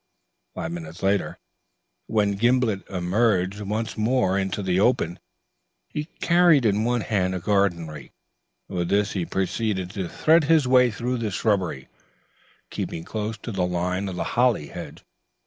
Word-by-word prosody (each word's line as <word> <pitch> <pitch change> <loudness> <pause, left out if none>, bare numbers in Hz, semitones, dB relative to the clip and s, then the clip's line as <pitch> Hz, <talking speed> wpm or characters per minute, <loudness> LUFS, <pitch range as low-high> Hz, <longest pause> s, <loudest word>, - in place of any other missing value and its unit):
Five 80 - -4
minutes 85 +1 -8
later, 100 0 0 0.7
when 105 -2 +2
Gimblet 120 -2 +1
emerged 95 +1 +1
once 110 +3 -3
more 110 -3 +1
into 100 +1 -1
the 95 -1 +1
open, 105 -6 +1 0.7
he 150 - -4
carried 170 -4 +3
in 105 0 +2
one 120 0 +1
hand 95 -3 0
a - - -2
garden 95 -3 +1
rake. 75 -3 -10 0.6
With 90 -2 -2
this 100 0 +2
he 90 -4 -2
proceeded 95 -1 -1
to 95 -4 -4
thread 160 0 +3
his 155 -3 +4
way 125 -1 +5
through 125 +3 -2
the 110 -2 -1
shrubbery, 95 -9 -1 0.8
keeping 80 - -4
close 110 +3 -4
to 115 - -4
the 95 -3 -2
line 90 +2 -1
of 90 - -5
the - - -2
holly 120 - +2
hedge. - - -9
100 Hz, 150 wpm, -24 LUFS, 90-115 Hz, 0.8 s, way